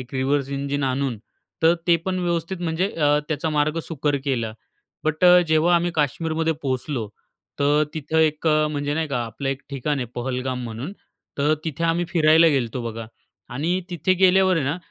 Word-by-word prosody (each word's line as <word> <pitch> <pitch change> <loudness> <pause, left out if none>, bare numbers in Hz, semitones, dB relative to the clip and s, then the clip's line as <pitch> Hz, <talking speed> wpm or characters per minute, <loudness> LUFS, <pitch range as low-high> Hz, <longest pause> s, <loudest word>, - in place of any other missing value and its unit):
एक 125 +1 -10
reverse 135 +1 0
engine 140 +1 -2
आणून 130 -3 -1 0.4
तर 165 +1 +6
ते 170 -1 +5
पण 185 -1 -1
व्यवस्थित 170 +1 -2
म्हणजे 175 +4 0
अ, 150 -2 +2
त्याचा 160 +1 -1
मार्ग 150 +2 +1
सुकर 150 -2 0
केला. 115 -5 -1 0.5
बट 155 +3 0
अ, 180 0 +8
जेव्हा 160 +3 +4
आम्ही 175 +1 0
काश्मीरमध्ये 160 +2 0
पोहोचलो, 130 -4 -2 0.5
तर 145 +1 +3
तिथं 155 +1 -1
एक 155 0 +1
अ, 155 -1 +3
म्हणजे 145 0 -2
नाही 160 -1 -1
का, 125 -4 -1
आपलं 115 +5 -5
एक 135 0 -3
ठिकाण 140 +1 -2
आहे 125 - -3
पहलगाम 125 0 -3
म्हणून, 120 - -6 0.5
तर 150 +2 +3
तिथे 160 +1 -3
आम्ही 165 +1 +1
फिरायला 160 -1 +5
गेलतो 130 -4 -1
बघा 115 0 -7 0.5
आणि 170 +7 0
तिथे 180 +2 +1
गेल्यावर 190 0 +4
आहे 155 - 0
ना, 145 +5 -1
150 Hz, 175 wpm, -23 LUFS, 135-165 Hz, 0.5 s, अ